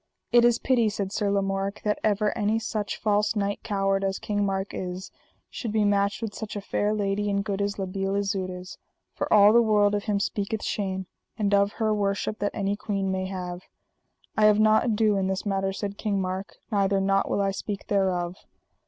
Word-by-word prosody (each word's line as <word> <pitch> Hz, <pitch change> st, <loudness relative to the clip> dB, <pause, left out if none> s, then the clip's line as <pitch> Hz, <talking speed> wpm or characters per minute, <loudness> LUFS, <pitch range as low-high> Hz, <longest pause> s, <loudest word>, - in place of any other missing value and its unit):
It 240 Hz, 0 st, +6 dB
is 240 Hz, -1 st, +5 dB
pity, 235 Hz, -4 st, +2 dB
said 200 Hz, -2 st, -3 dB
Sir 205 Hz, 0 st, 0 dB
Lamorak, 195 Hz, 0 st, -1 dB
that 210 Hz, -1 st, 0 dB
ever 210 Hz, 0 st, +1 dB
any 215 Hz, 0 st, +1 dB
such 215 Hz, -2 st, -3 dB
false 210 Hz, +1 st, +1 dB
knight 200 Hz, -1 st, -1 dB
coward 195 Hz, -2 st, 0 dB
as 195 Hz, 0 st, 0 dB
King 205 Hz, -1 st, -1 dB
Mark 195 Hz, 0 st, -2 dB
is, 185 Hz, +1 st, -5 dB, 0.4 s
should 230 Hz, -, -5 dB
be 215 Hz, -1 st, +2 dB
matched 200 Hz, +2 st, +1 dB
with 215 Hz, -2 st, -3 dB
such 215 Hz, +1 st, -6 dB
a -, -, -2 dB
fair 205 Hz, +1 st, 0 dB
lady 205 Hz, -1 st, 0 dB
and 200 Hz, 0 st, 0 dB
good 200 Hz, -2 st, -2 dB
as 200 Hz, 0 st, -1 dB
La 195 Hz, -, -2 dB
Beale 195 Hz, +1 st, -2 dB
Isoud 195 Hz, -2 st, -1 dB
is, 180 Hz, 0 st, -8 dB, 0.3 s
for -, -, -3 dB
all 210 Hz, 0 st, +7 dB
the 235 Hz, -, +7 dB
world 210 Hz, -2 st, +3 dB
of 205 Hz, -1 st, -1 dB
him 205 Hz, -2 st, +1 dB
speaketh 205 Hz, +2 st, -2 dB
shame, 190 Hz, -2 st, -2 dB, 0.3 s
and 205 Hz, -2 st, 0 dB
of 200 Hz, 0 st, +3 dB
her 220 Hz, -2 st, 0 dB
worship 205 Hz, +1 st, -1 dB
that 205 Hz, -, -2 dB
any 200 Hz, -1 st, 0 dB
queen 195 Hz, -2 st, -2 dB
may 185 Hz, 0 st, -2 dB
have. 180 Hz, -2 st, -5 dB, 0.7 s
I 215 Hz, -, +4 dB
have 210 Hz, 0 st, +5 dB
not 215 Hz, +1 st, +4 dB
ado 215 Hz, -3 st, +2 dB
in 190 Hz, -1 st, 0 dB
this 190 Hz, +2 st, -2 dB
matter, 195 Hz, -1 st, 0 dB
said 200 Hz, +1 st, -5 dB
King 205 Hz, -3 st, 0 dB
Mark, 190 Hz, +1 st, -4 dB, 0.2 s
neither 200 Hz, -1 st, +2 dB
nought 195 Hz, 0 st, +1 dB
will -, -, 0 dB
I 195 Hz, -1 st, +1 dB
speak 200 Hz, +1 st, -5 dB
thereof. 185 Hz, -3 st, 0 dB
200 Hz, 205 wpm, -26 LUFS, 195-210 Hz, 0.7 s, all